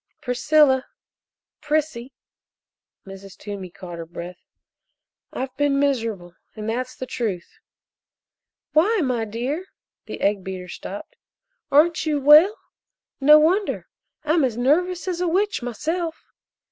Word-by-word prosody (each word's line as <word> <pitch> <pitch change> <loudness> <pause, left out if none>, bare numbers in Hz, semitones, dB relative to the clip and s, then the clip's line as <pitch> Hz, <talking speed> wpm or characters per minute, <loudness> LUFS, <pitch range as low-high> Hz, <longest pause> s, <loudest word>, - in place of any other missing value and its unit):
"Priscilla 265 +1 +3 0.7
Prissy 295 -4 -1 0.5
" - - -63
Mrs. 195 0 -11
Toomey 200 -3 -7
caught 175 -1 -9
her 165 - -6
breath 175 +2 -8 0.9
"I've 260 0 -5
been 285 -1 +2
miserable 225 -11 -1 0.2
and 215 0 -6
that's 255 +3 -3
the 255 - -6
truth!" 210 -9 -4 1.1
"Why, 390 +7 +3
my 245 -4 0
dear!" 255 - -4 0.4
The - - -7
egg 200 -1 +1
beater 185 -1 -6
stopped. 205 - -8 0.5
"Aren't 315 +2 +4
you 300 -2 +1
well? 305 - +7 0.6
No 300 +2 +8
wonder 360 +7 +1 0.3
I'm 310 +1 +2
as 245 -4 0
nervous 345 +9 +1
as 360 -1 -2
a 360 - +1
witch 390 +2 0
myself." 320 +8 -3
265 Hz, 120 wpm, -23 LUFS, 210-315 Hz, 1.1 s, No